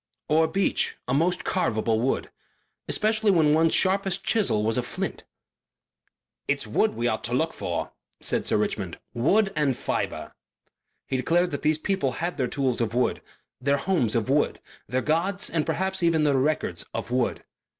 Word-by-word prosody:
Or 160 Hz, +1 st, +3 dB
beech 195 Hz, +2 st, 0 dB
a 125 Hz, -, 0 dB
most 170 Hz, +6 st, +1 dB
carvable 110 Hz, -10 st, 0 dB
wood. 130 Hz, +4 st, -1 dB, 0.6 s
Especially 215 Hz, 0 st, +2 dB
when 160 Hz, -6 st, +4 dB
one's 160 Hz, +1 st, +4 dB
sharpest 195 Hz, 0 st, +2 dB
chisel 195 Hz, -, +1 dB
was 110 Hz, +1 st, +1 dB
a 125 Hz, -, +1 dB
flint. 120 Hz, -, -4 dB, 1.2 s
"It's -, -, 0 dB
wood -, -, +1 dB
we 120 Hz, +1 st, 0 dB
ought 110 Hz, -2 st, -1 dB
to 120 Hz, +1 st, -1 dB
look 160 Hz, +4 st, 0 dB
for," -, -, -3 dB, 0.3 s
said -, -, -2 dB
Sir -, -, +2 dB
Richmond. -, -, -2 dB, 0.2 s
"Wood 195 Hz, -, +2 dB
and 145 Hz, -4 st, +1 dB
fibre." -, -, -3 dB, 0.7 s
He 130 Hz, -, -1 dB
declared 175 Hz, +7 st, +1 dB
that 145 Hz, -, -3 dB
these 155 Hz, 0 st, +2 dB
people 155 Hz, -7 st, -1 dB
had 170 Hz, +6 st, -3 dB
their 130 Hz, -3 st, 0 dB
tools 130 Hz, -2 st, 0 dB
of 115 Hz, 0 st, -1 dB
wood, 125 Hz, -, +1 dB, 0.4 s
their 140 Hz, +2 st, +2 dB
homes 140 Hz, -, 0 dB
of 115 Hz, -1 st, 0 dB
wood, 145 Hz, +3 st, +1 dB, 0.3 s
their 130 Hz, +1 st, -1 dB
gods 180 Hz, +6 st, 0 dB
and 160 Hz, -2 st, 0 dB
perhaps 190 Hz, +1 st, -1 dB
their 160 Hz, -4 st, +3 dB
records 150 Hz, +4 st, 0 dB
of -, -, -4 dB
wood. 125 Hz, -1 st, 0 dB
150 Hz, 165 wpm, -26 LUFS, 125-180 Hz, 1.2 s, when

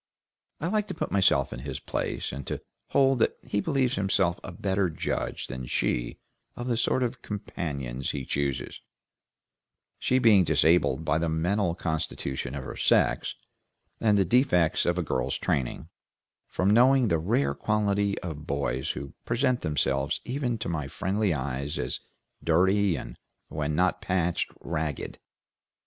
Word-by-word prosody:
I 150 Hz, -, -3 dB
like 210 Hz, +4 st, 0 dB
to -, -, -5 dB
put -, -, -3 dB
myself 90 Hz, -8 st, +3 dB
in -, -, -6 dB
his 70 Hz, 0 st, -5 dB
place, -, -, -3 dB
and 70 Hz, -1 st, -7 dB
to -, -, -2 dB, 0.3 s
hold 135 Hz, -2 st, +3 dB
that -, -, +2 dB
he 100 Hz, -, 0 dB
believes 135 Hz, -2 st, +1 dB
himself 95 Hz, -3 st, +1 dB
a -, -, -6 dB
better 95 Hz, +1 st, 0 dB
judge 80 Hz, -, -3 dB
than 65 Hz, -2 st, -6 dB
she -, -, -1 dB, 0.4 s
of 120 Hz, -, -5 dB
the 120 Hz, -, +1 dB
sort 125 Hz, +2 st, +1 dB
of 125 Hz, 0 st, -3 dB
companions 70 Hz, -, -4 dB
he 70 Hz, -3 st, -3 dB
chooses, 70 Hz, -3 st, -2 dB, 1.2 s
she 130 Hz, -, +2 dB
being 110 Hz, -7 st, +6 dB
disabled 80 Hz, -1 st, +3 dB
by 80 Hz, 0 st, +2 dB
the 85 Hz, 0 st, 0 dB
mental 85 Hz, +3 st, +1 dB
constitution 75 Hz, -6 st, -3 dB
of 70 Hz, -, -4 dB
her -, -, -7 dB
sex, -, -, +2 dB, 0.6 s
and 105 Hz, -2 st, +3 dB
the 95 Hz, -, +4 dB
defects 90 Hz, -, +3 dB
of 85 Hz, +1 st, +2 dB
a 90 Hz, -, +1 dB
girl's 65 Hz, -5 st, -1 dB
training, 65 Hz, -4 st, -1 dB, 0.6 s
from 95 Hz, +2 st, +1 dB
knowing 125 Hz, +1 st, +5 dB
the 85 Hz, -, +2 dB
rare 80 Hz, -6 st, +1 dB
quality 100 Hz, +2 st, +1 dB
of 75 Hz, -4 st, -6 dB
boys 70 Hz, -2 st, -1 dB
who 70 Hz, -, -7 dB
present 125 Hz, +1 st, +1 dB
themselves 70 Hz, -2 st, 0 dB
even 125 Hz, -2 st, -1 dB
to -, -, -4 dB
my 80 Hz, -4 st, -2 dB
friendly 95 Hz, +7 st, 0 dB
eyes 70 Hz, -1 st, -2 dB
as 60 Hz, +1 st, -2 dB, 0.4 s
dirty, 95 Hz, +3 st, +3 dB
and, -, -, -8 dB, 0.3 s
when 75 Hz, 0 st, -2 dB
not 90 Hz, +3 st, +2 dB
patched, 90 Hz, -2 st, 0 dB
ragged. 80 Hz, -4 st, -3 dB
85 Hz, 155 wpm, -27 LUFS, 70-105 Hz, 1.2 s, being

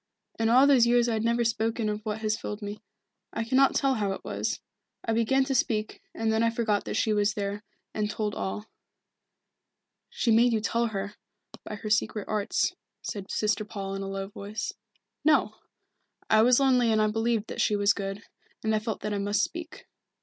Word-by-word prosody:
In 225 Hz, 0 st, +2 dB
all 255 Hz, +4 st, +7 dB
those 265 Hz, -5 st, +5 dB
years 240 Hz, 0 st, +4 dB
I 235 Hz, -, +1 dB
have 220 Hz, 0 st, -1 dB
never 235 Hz, +1 st, +2 dB
spoken 225 Hz, 0 st, 0 dB
of 210 Hz, 0 st, -2 dB
what 215 Hz, 0 st, -3 dB
has 215 Hz, -1 st, +1 dB
filled 210 Hz, -1 st, -6 dB
me. 205 Hz, +1 st, -6 dB, 0.5 s
I 225 Hz, -, -1 dB
cannot 260 Hz, +4 st, +3 dB
tell 275 Hz, -1 st, +3 dB
how 205 Hz, -5 st, 0 dB
it -, -, -8 dB
was. -, -, -2 dB, 0.5 s
I 225 Hz, -, 0 dB
began 230 Hz, +4 st, +3 dB
to 270 Hz, +1 st, -1 dB
speak, 220 Hz, -4 st, 0 dB
and 225 Hz, 0 st, 0 dB
then 220 Hz, -, +2 dB
I 230 Hz, -, +4 dB
forgot 225 Hz, -3 st, 0 dB
that -, -, -3 dB
she 220 Hz, -, +2 dB
was 210 Hz, +1 st, +1 dB
there, 205 Hz, -1 st, -3 dB, 0.3 s
and 210 Hz, -1 st, -1 dB
told 210 Hz, -1 st, -2 dB
all." 210 Hz, +2 st, -4 dB, 1.4 s
"She 235 Hz, -, 0 dB
made 235 Hz, +2 st, +5 dB
you 220 Hz, -, +2 dB
tell 235 Hz, +2 st, 0 dB
her, 200 Hz, -1 st, -4 dB, 0.5 s
by 210 Hz, -, -6 dB
her 210 Hz, +1 st, -6 dB
secret 215 Hz, -1 st, +1 dB
arts," 210 Hz, -2 st, 0 dB, 0.3 s
said 200 Hz, -2 st, -5 dB
Sister 215 Hz, 0 st, 0 dB
Paul 200 Hz, -2 st, -5 dB
in 195 Hz, -, -4 dB
a 195 Hz, -, -4 dB
low 195 Hz, 0 st, -4 dB
voice. 205 Hz, +1 st, -5 dB, 0.5 s
"No 310 Hz, +1 st, +3 dB, 0.8 s
I 215 Hz, -, +7 dB
was 245 Hz, +2 st, +5 dB
lonely 250 Hz, -4 st, +4 dB
and 220 Hz, -, +3 dB
I 215 Hz, -, +4 dB
believed 225 Hz, 0 st, 0 dB
that -, -, -2 dB
she 210 Hz, -, +2 dB
was 205 Hz, 0 st, +3 dB
good, 195 Hz, +1 st, -5 dB, 0.4 s
and 220 Hz, 0 st, +1 dB
I 215 Hz, -, +2 dB
felt 220 Hz, 0 st, -4 dB
that 210 Hz, -, -2 dB
I 200 Hz, -, -1 dB
must 205 Hz, +1 st, +1 dB
speak. 335 Hz, -1 st, -6 dB
220 Hz, 200 wpm, -28 LUFS, 210-230 Hz, 1.4 s, all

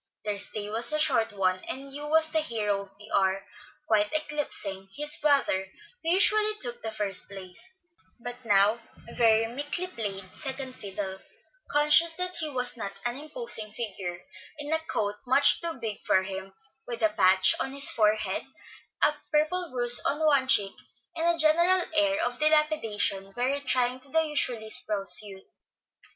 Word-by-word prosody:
Their 205 Hz, -1 st, -3 dB
stay 205 Hz, +1 st, -2 dB
was 225 Hz, +6 st, -1 dB
a 305 Hz, -, +1 dB
short 255 Hz, -7 st, +2 dB
one, 185 Hz, -2 st, -1 dB
and 275 Hz, +1 st, -8 dB
Hugh 290 Hz, +1 st, -6 dB
was 315 Hz, +1 st, +3 dB
the 320 Hz, -, +2 dB
hero 210 Hz, -8 st, -2 dB
of 195 Hz, 0 st, -15 dB
the 210 Hz, +1 st, -15 dB
hour, 190 Hz, 0 st, 0 dB, 0.4 s
quite 210 Hz, -4 st, +1 dB
eclipsing 290 Hz, -11 st, -2 dB
his 295 Hz, +1 st, 0 dB
brother, 275 Hz, -11 st, +1 dB, 0.3 s
who 325 Hz, -, -3 dB
usually 425 Hz, +4 st, +5 dB
took 240 Hz, -, -1 dB
the 220 Hz, -, -5 dB
first 210 Hz, -3 st, -1 dB
place, 195 Hz, -, -7 dB, 0.4 s
but 245 Hz, +1 st, -8 dB
now 205 Hz, +1 st, +3 dB, 0.3 s
very 225 Hz, -1 st, +3 dB
meekly 290 Hz, +9 st, -2 dB
played 195 Hz, -, -6 dB
second 265 Hz, -2 st, -3 dB
fiddle, 195 Hz, -3 st, -6 dB, 0.5 s
conscious 300 Hz, +3 st, +3 dB
that 365 Hz, +1 st, -3 dB
he 310 Hz, -, -3 dB
was 250 Hz, -3 st, 0 dB
not 200 Hz, -3 st, -5 dB
an 240 Hz, +2 st, -1 dB
imposing 305 Hz, -, -4 dB
figure, 190 Hz, -6 st, -6 dB, 0.4 s
in 295 Hz, +1 st, -4 dB
a 320 Hz, -, +2 dB
coat 210 Hz, -10 st, -3 dB
much 275 Hz, +3 st, +4 dB
too 335 Hz, -1 st, -3 dB
big 225 Hz, -5 st, -6 dB
for 190 Hz, -, +2 dB
him, 190 Hz, 0 st, -8 dB, 0.3 s
with 235 Hz, -2 st, -5 dB
a 215 Hz, -, +4 dB
patch 190 Hz, -2 st, +4 dB
on 270 Hz, -, -3 dB
his 275 Hz, +1 st, +3 dB
forehead, 215 Hz, -1 st, 0 dB, 0.6 s
a 300 Hz, -, +4 dB, 0.2 s
purple 330 Hz, +4 st, +1 dB
bruise 245 Hz, -2 st, +5 dB
on 285 Hz, -, 0 dB
one 280 Hz, -4 st, +3 dB
cheek, 200 Hz, -6 st, +3 dB, 0.4 s
and 330 Hz, 0 st, -1 dB
a 340 Hz, 0 st, +2 dB
general 340 Hz, +4 st, +4 dB
air 305 Hz, 0 st, +1 dB
of 245 Hz, -, -4 dB
dilapidation 300 Hz, -11 st, +1 dB
very 260 Hz, +3 st, -1 dB
trying 255 Hz, -2 st, 0 dB
to 270 Hz, +2 st, -16 dB
the 320 Hz, +3 st, +2 dB
usually 245 Hz, -7 st, -1 dB
spruce 210 Hz, -6 st, +4 dB
youth. 195 Hz, -2 st, -11 dB
245 Hz, 165 wpm, -26 LUFS, 205-300 Hz, 0.6 s, usually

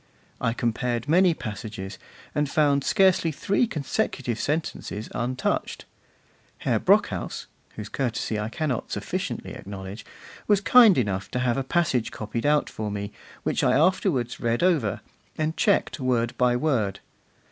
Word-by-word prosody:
I 115 Hz, -, +1 dB
compared 120 Hz, +1 st, -1 dB
many 175 Hz, +2 st, +4 dB
passages, 105 Hz, -5 st, -6 dB, 0.3 s
and 150 Hz, -1 st, 0 dB
found 145 Hz, -2 st, +2 dB
scarcely 185 Hz, -2 st, +3 dB
three 200 Hz, -, +1 dB
consecutive 135 Hz, -, -2 dB
sentences 145 Hz, -8 st, -3 dB
untouched. 130 Hz, +2 st, -2 dB, 0.8 s
Herr -, -, +1 dB
Brockhaus -, -, +1 dB, 0.3 s
(whose 105 Hz, -1 st, -6 dB
courtesy 115 Hz, -3 st, -2 dB
I 105 Hz, +1 st, -2 dB
cannot 140 Hz, -2 st, -2 dB
sufficiently -, -, -4 dB
acknowledge) 95 Hz, +1 st, -8 dB, 0.4 s
was 205 Hz, -2 st, +4 dB
kind 225 Hz, -1 st, +7 dB
enough 100 Hz, -6 st, -1 dB
to 125 Hz, -, -2 dB
have 120 Hz, -2 st, +1 dB
a 135 Hz, -, 0 dB
passage 135 Hz, -5 st, +1 dB
copied 115 Hz, +4 st, -3 dB
out 150 Hz, 0 st, +3 dB
for 110 Hz, -1 st, -4 dB
me, 100 Hz, 0 st, -4 dB, 0.3 s
which -, -, 0 dB
I 125 Hz, -, +4 dB
afterwards 155 Hz, -, +1 dB
read 115 Hz, +4 st, 0 dB
over, 155 Hz, -, +2 dB, 0.4 s
and 155 Hz, +1 st, -1 dB
checked 200 Hz, -6 st, +1 dB
word 120 Hz, -3 st, 0 dB
by 125 Hz, -1 st, +3 dB
word. 120 Hz, -9 st, 0 dB
125 Hz, 135 wpm, -25 LUFS, 110-155 Hz, 0.8 s, kind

